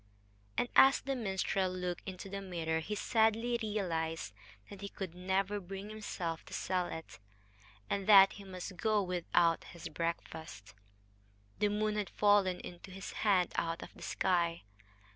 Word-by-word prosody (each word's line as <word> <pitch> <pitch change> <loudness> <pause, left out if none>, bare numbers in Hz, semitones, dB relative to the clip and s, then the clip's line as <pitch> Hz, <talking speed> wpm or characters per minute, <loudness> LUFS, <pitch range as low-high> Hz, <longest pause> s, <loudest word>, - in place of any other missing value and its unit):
And - - +2
as 270 +1 +8
the 275 0 -2
minstrel 190 -4 0
looked 180 -1 -3
into 185 +1 -7
the 195 0 -5
mirror 165 -4 -1
he 200 +6 -4
sadly 225 +3 +2
realized 165 - -2 0.4
that 200 -1 -9
he 200 - -5
could 190 -4 -6
never 190 +3 0
bring 195 +2 -7
himself 180 -6 -4
to - - -7
sell 180 -1 0
it 160 -9 -8 0.7
and 195 - -2
that 195 -2 +9
he 205 - -10
must 185 -1 -7
go 215 +1 +2
without 175 -2 +2
his 170 -1 -8
breakfast. 160 -10 -5 0.9
The 210 - +3
moon 210 +1 0
had 205 -2 -1
fallen 205 -3 +3
into 175 +2 -9
his 190 +1 -7
hand 190 -5 +2
out 165 0 -1
of - - -11
the - - -16
sky. 170 -3 0
190 Hz, 155 wpm, -33 LUFS, 170-205 Hz, 0.9 s, that